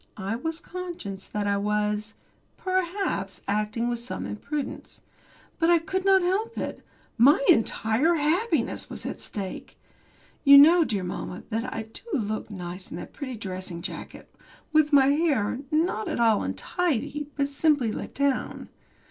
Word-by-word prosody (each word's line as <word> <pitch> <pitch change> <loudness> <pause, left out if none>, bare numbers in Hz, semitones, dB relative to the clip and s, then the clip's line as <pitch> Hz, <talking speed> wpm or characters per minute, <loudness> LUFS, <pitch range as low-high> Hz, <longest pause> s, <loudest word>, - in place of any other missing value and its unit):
I 200 +2 -2
was 320 +7 -3
conscious 340 - -7
that 210 -1 -3
I 200 0 +1
was, 210 +1 -1 0.4
perhaps, 370 - -1
acting 215 +3 0
with 240 -1 -1
some 235 - -5
imprudence. 285 +7 -5 0.6
But 330 0 +3
I 345 - +7
could 375 +3 -3
not 385 -1 +5
help 420 +6 0
it. - - -4 0.4
My 275 +6 +7
entire 225 +8 +3
happiness 335 +9 0
was - - -7
at - - -4
stake. 195 -3 -6 0.7
You 280 -1 +9
know, 330 +5 +8
dear 205 -10 -1
mamma, 180 0 -5
that 230 +4 -2
I 225 - -3
do 220 0 -9 0.2
look 215 -2 -3
nice 180 -2 -7
in - - -6
that - - -9
pretty 260 -4 -5
dressing 185 -4 -6
jacket, - - -8 0.4
with 310 -1 +4
my 280 -2 +7
hair, 280 -7 +1
not 310 -8 0
at - - -2
all 225 -3 +4
untidy, 295 -4 -2
but 280 -1 +1
simply 285 -4 +2
let - - -6
down. 280 -2 -1
255 Hz, 150 wpm, -26 LUFS, 210-325 Hz, 0.7 s, You